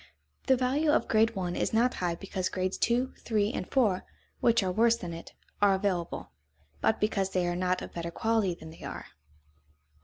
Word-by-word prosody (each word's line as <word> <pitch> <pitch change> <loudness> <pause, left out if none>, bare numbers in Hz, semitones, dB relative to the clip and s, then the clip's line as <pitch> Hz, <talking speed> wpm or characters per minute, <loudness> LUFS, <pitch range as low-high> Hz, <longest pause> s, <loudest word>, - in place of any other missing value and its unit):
The 265 - +5
value 270 +5 +1
of 300 - +3
grade 225 +1 +3
one 180 -2 -2
is - - -1
not 240 +3 +3
high 175 -2 0
because 185 0 -3
grades 185 0 -1
two, 245 +3 +1
three, 215 0 0
and - - -4
four, 215 -9 +2 0.4
which 230 -3 +3
are 185 - 0
worse 230 +4 +4
than 175 -6 -6
it, 165 - -9 0.3
are 200 -1 +5
available, 190 -3 -2 0.5
but 220 - +2
because 200 -2 +1
they 185 -2 0
are 175 0 -1
not 180 0 0
of - - -9
better 170 0 -4
quality 220 -1 0
than 160 -1 -11
they 160 - -15
are. - - -6
200 Hz, 190 wpm, -29 LUFS, 180-230 Hz, 0.5 s, The